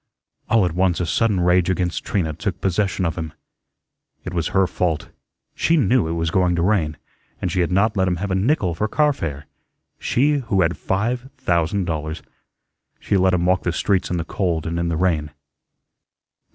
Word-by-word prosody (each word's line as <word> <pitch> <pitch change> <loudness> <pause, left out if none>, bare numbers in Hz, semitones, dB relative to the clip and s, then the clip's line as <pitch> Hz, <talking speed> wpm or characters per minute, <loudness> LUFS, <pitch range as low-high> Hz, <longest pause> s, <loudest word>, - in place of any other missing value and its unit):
All 115 -4 +4
at 90 - -1
once 90 0 +1
a 90 - 0
sudden 100 +2 +1
rage 90 0 +3
against 90 -1 -1
Trina 85 -7 -1
took - - -4
possession 95 0 0
of 85 +1 -2
him. 80 -1 -5 0.9
It 90 - -6
was 85 -2 0
her 95 0 +2
fault. 85 -3 -2 0.4
She 165 - +2
knew 125 - +3
it 80 - -2
was 85 0 -1
going 90 -1 +2
to 85 - 0
rain, 85 -7 +1 0.4
and 90 - -2
she 90 - -1
had 85 - 0
not 105 +4 +2
let 95 -1 +2
him 90 - +1
have 95 +3 -4
a - - +2
nickel 95 - +1
for 105 +6 -1
car 150 +5 +2
fare 75 - -5 0.5
she 145 +4 +2
who 115 -7 0
had 85 +1 0
five 120 +7 -2
thousand 90 -4 0
dollars. 80 -1 -4 0.8
She - - -1
let 95 -1 +3
him 85 -1 0
walk 90 0 +3
the 90 - -1
streets 95 +2 0
in 90 - -1
the 85 - -2
cold 85 -5 -1
and 85 +1 -2
in 85 - 0
the 85 -1 -1
rain. 80 -4 +1
90 Hz, 195 wpm, -21 LUFS, 85-100 Hz, 0.9 s, All